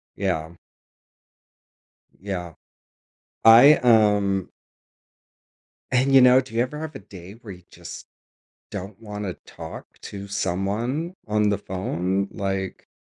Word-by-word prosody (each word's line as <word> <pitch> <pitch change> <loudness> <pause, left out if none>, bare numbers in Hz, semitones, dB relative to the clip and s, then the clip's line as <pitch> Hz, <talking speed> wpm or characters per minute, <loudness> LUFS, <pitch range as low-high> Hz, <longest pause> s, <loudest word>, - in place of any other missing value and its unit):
Yeah. 85 -4 -2 1.7
Yeah. 90 -4 -5 0.9
I 120 +7 +9
um 105 -5 +3 1.4
And 130 +2 +2
you 135 - +9
know, 125 0 +7
do 130 -3 -14
you 115 - +2
ever 140 +5 -3
have 155 -2 -7
a - - -6
day 95 -2 -12
where 115 -2 -12
you 90 -1 -16
just - - -11 0.6
don't 95 +2 -7
want 105 -1 -6
to 90 - -3
talk - - -11
to 100 0 -8
someone 105 - -2
on 105 0 +2
the 100 - +1
phone, 95 0 -2
like 95 -1 -4
100 Hz, 120 wpm, -23 LUFS, 95-120 Hz, 1.7 s, I